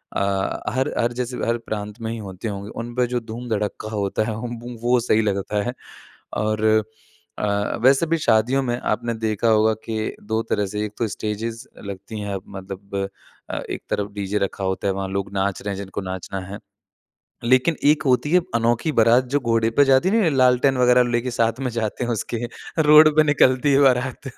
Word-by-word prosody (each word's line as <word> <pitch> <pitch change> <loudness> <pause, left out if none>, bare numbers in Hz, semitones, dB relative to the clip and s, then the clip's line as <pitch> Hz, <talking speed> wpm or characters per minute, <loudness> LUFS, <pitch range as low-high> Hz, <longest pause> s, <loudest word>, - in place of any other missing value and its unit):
अ, 100 -1 -1
हर 130 +1 0
हर 120 +1 +1
जैसे 125 0 -4
हर 115 0 +1
प्रांत 105 +1 -5
में 110 0 -3
ही 115 - -4
होते 100 0 -7
होंगे, 100 0 -5
उन 120 +1 -6
पे 125 -1 +2
जो 120 - +1
धूम-धड़क्का 110 -2 -4
होता 105 0 -1
ह 110 - -3
म 120 +1 -7
वो 125 +1 +3
सही 110 -2 +2
लगता 100 0 -1
है। 120 - -3 0.6
और 110 0 -1 0.8
अ, 100 0 -1
वैसे 135 +5 +5
भी 165 +1 +1
शादियों 125 +1 +2
में 120 -1 -1
आपने 120 -1 -1
देखा 110 +1 0
होगा 110 0 +4
कि 110 -1 -3
2 110 +2 -1
तरह 105 -1 +1
से 105 +2 -3
एक 105 - -7
तो 115 - 0
स्टेजेज़ 110 +2 -4 0.2
लगती 100 +2 -7
हैं 100 -1 -3
मतलब 95 0 -5 0.4
अ, - - -3
एक - - -4
तरफ़ 100 0 -2
डीजे 100 0 -2
रखा 100 0 -3
होता 95 +1 -1
है, 95 - +1
वहाँ 95 0 -3
लोग 100 0 -3
नाच 100 0 -1
रहे 100 -1 -3
हैं - - -8
जिनको 100 0 -5
नाचना 95 0 -5
है। 100 +1 -7 0.9
लेकिन 130 +6 +3
एक 150 +1 +4
होती 130 +3 +2
है 180 - +6
अनोखी 115 +6 +1
बारात 115 +3 +5
जो - - +5
घोड़े 115 -2 +1
पे 145 - +7
जाती 135 +7 +4
नहीं 225 +2 +3
है 175 - +3
लालटेन 130 0 +3
वग़ैरह 125 0 +5
लेके 120 +1 0
साथ 115 -1 0
में 130 -2 -1
जाते 115 +1 -2
हैं 120 - -2
उसके, 115 +1 -2 0.4
रोड 155 +1 +8
पे 155 - +7
निकलती 145 -1 +3
है 140 - +5
बारात। 130 0 +1
115 Hz, 195 wpm, -22 LUFS, 100-125 Hz, 0.9 s, रोड